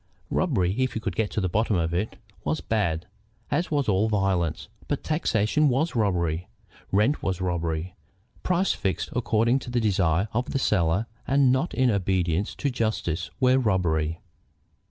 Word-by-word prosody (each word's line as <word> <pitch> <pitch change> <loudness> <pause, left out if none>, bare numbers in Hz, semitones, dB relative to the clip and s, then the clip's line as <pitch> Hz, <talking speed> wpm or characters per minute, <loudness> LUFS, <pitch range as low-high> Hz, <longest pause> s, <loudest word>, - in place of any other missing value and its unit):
Robbery, 95 - +1
if 130 0 0
you - - 0
could - - -3
get 110 -2 0
to - - -2
the 95 - +1
bottom 105 +4 +1
of 85 -1 0
it, 95 +5 -2 0.3
was 75 +1 -1
bad, 85 -2 -1 0.5
as 165 +5 0
was 145 -3 0
all 105 +2 +2
violence; 95 -6 0 0.2
but - - -2
taxation 150 -2 +2
was 135 +6 0
robbery, 90 -6 0 0.4
rent 105 +10 +2
was 95 -1 -1
robbery, 85 -1 -2 0.5
prices 185 +1 +1
fixed 95 -3 -2
according 115 +1 +2
to 125 - -9
the 120 0 +1
desire 95 -3 +2
of 120 +3 -1
the - - +1
seller 95 -4 +2 0.2
and 135 -1 +4
not 130 +6 0
in 130 -2 +3
obedience 95 -1 0
to 140 - -1
justice, 95 -8 -1
were 130 0 +4
robbery. 85 -8 +1
105 Hz, 160 wpm, -26 LUFS, 85-125 Hz, 0.5 s, and